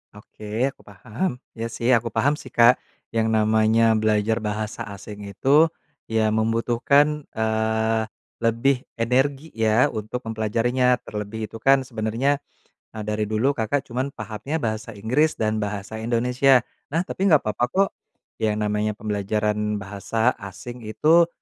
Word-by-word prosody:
Oke 110 Hz, +4 st, -3 dB
aku -, -, -23 dB
paham. 110 Hz, -, -3 dB, 0.2 s
Iya 115 Hz, 0 st, -4 dB
sih 115 Hz, +1 st, -2 dB
aku 120 Hz, -1 st, +3 dB
paham 145 Hz, +6 st, +1 dB
sih, -, -, -11 dB
Kak. 120 Hz, +1 st, +5 dB, 0.3 s
Yang 115 Hz, -1 st, +1 dB
namanya 110 Hz, +1 st, +3 dB
belajar 110 Hz, +1 st, +1 dB
bahasa 105 Hz, 0 st, -4 dB
asing 100 Hz, +1 st, -9 dB
itu 140 Hz, +11 st, +4 dB, 0.4 s
ya 110 Hz, -1 st, +1 dB
membutuhkan, 120 Hz, +7 st, +2 dB
eee, 110 Hz, 0 st, +1 dB, 0.4 s
lebih 120 Hz, +3 st, +1 dB
energi 135 Hz, +6 st, 0 dB
ya 110 Hz, +2 st, +2 dB
untuk 110 Hz, +3 st, -5 dB
mempelajarinya, 115 Hz, +3 st, +1 dB
terlebih 105 Hz, +1 st, -5 dB
itu -, -, -7 dB
kan 135 Hz, +3 st, +4 dB
sebenarnya, 120 Hz, +4 st, -1 dB, 0.6 s
eee, 110 Hz, -, -4 dB
dari 105 Hz, 0 st, -2 dB
dulu 110 Hz, +6 st, +2 dB
Kakak 130 Hz, +1 st, -1 dB
cuman 130 Hz, +3 st, -4 dB
pahamnya 140 Hz, +8 st, -4 dB
bahasa 110 Hz, 0 st, -3 dB
Inggris 125 Hz, +10 st, +1 dB
dan 110 Hz, 0 st, 0 dB
bahasa 105 Hz, +1 st, -4 dB
Indonesia. 125 Hz, +3 st, +3 dB, 0.2 s
Nah 165 Hz, +4 st, 0 dB
tapi 190 Hz, +1 st, -1 dB
nggak 155 Hz, -6 st, +5 dB
papa 110 Hz, +3 st, -2 dB
kok, 195 Hz, +8 st, +2 dB, 0.5 s
ya 110 Hz, -2 st, +1 dB
namanya 105 Hz, 0 st, -1 dB
pembelajaran 105 Hz, 0 st, -1 dB
bahasa 105 Hz, +4 st, -1 dB
asing 120 Hz, +5 st, -8 dB
itu 165 Hz, +9 st, +4 dB
110 Hz, 135 wpm, -23 LUFS, 110-125 Hz, 0.6 s, Kak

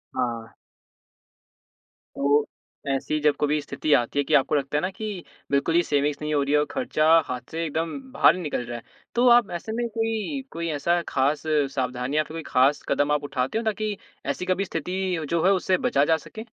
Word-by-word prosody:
हाँ। 115 Hz, -3 st, -3 dB, 1.6 s
तो 145 Hz, +1 st, +2 dB, 0.4 s
ऐसी 135 Hz, +3 st, -1 dB
जब 150 Hz, -1 st, +3 dB
कभी 150 Hz, +1 st, +2 dB
स्थिति 150 Hz, +1 st, -3 dB
आती 120 Hz, +4 st, +2 dB
है -, -, +3 dB
कि -, -, -2 dB
आपको 140 Hz, +2 st, +4 dB
लगता 140 Hz, +1 st, 0 dB
है -, -, +1 dB
ना 185 Hz, -, -1 dB
कि 205 Hz, -3 st, -6 dB, 0.3 s
बिल्कुल 140 Hz, +4 st, +1 dB
ही 175 Hz, -, +6 dB
सेविंग्स 145 Hz, -1 st, 0 dB
नहीं 150 Hz, 0 st, -2 dB
हो 145 Hz, -, +2 dB
रही 140 Hz, +1 st, -1 dB
है 150 Hz, -, +5 dB
और 150 Hz, -, +1 dB
खर्चा 250 Hz, -13 st, 0 dB, 0.2 s
हाथ 125 Hz, -1 st, -4 dB
से 165 Hz, +1 st, -2 dB
एकदम 160 Hz, -, -3 dB
बाहर -, -, +5 dB
ही 185 Hz, -, -5 dB
निकल 145 Hz, -6 st, -2 dB
रहा 120 Hz, 0 st, -5 dB
है, 115 Hz, -, -11 dB, 0.3 s
तो 245 Hz, +1 st, +4 dB
आप 240 Hz, -3 st, +5 dB
ऐसे 220 Hz, -, -8 dB
में 235 Hz, +2 st, -1 dB
कोई 225 Hz, +4 st, -2 dB
कोई 170 Hz, 0 st, -4 dB
ऐसा 170 Hz, +4 st, +1 dB
खास 140 Hz, +3 st, +1 dB, 0.3 s
सावधानियाँ 130 Hz, +3 st, -1 dB
कभी 160 Hz, 0 st, -6 dB
खास 135 Hz, +3 st, +3 dB
कदम 145 Hz, 0 st, +2 dB
आप 150 Hz, 0 st, +1 dB
उठाते 135 Hz, +4 st, -2 dB
हो, 230 Hz, -, -1 dB
ताकि 215 Hz, -1 st, -1 dB, 0.3 s
ऐसी 180 Hz, -, -2 dB
कभी 185 Hz, +2 st, 0 dB
स्थिति 180 Hz, 0 st, -2 dB
जो 170 Hz, 0 st, +1 dB
है, 195 Hz, -, +6 dB
उससे 185 Hz, -1 st, +2 dB
बचा 145 Hz, -, +3 dB
जा 160 Hz, 0 st, +3 dB
सके? 220 Hz, +8 st, -10 dB
155 Hz, 205 wpm, -25 LUFS, 140-185 Hz, 1.6 s, ही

